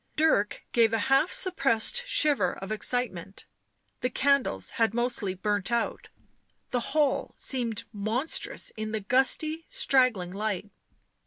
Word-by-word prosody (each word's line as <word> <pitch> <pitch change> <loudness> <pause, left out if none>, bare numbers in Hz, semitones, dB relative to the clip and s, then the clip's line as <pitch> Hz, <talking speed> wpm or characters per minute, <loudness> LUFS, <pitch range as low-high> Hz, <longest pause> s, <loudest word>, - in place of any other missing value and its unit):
Dirk 305 -10 +1
gave 230 -2 +4
a - - +3 0.2
half 290 +6 +3
suppressed 365 - +2
shiver 285 - +3
of 195 +2 -8
excitement; 215 -5 -2 0.5
the 250 - -1
candles 255 - +1
had 225 -1 +2
mostly 240 -6 -1
burnt 205 +2 -1
out; 235 0 -2 0.6
the 245 - +1 0.2
hall 290 -3 +1
seemed 235 -5 -1
monstrous 220 +9 -2
in 215 0 -5
the 220 - -1
gusty, 270 +8 +1
straggling 255 - +2
light. 205 -1 -3
235 Hz, 125 wpm, -27 LUFS, 205-270 Hz, 0.6 s, gave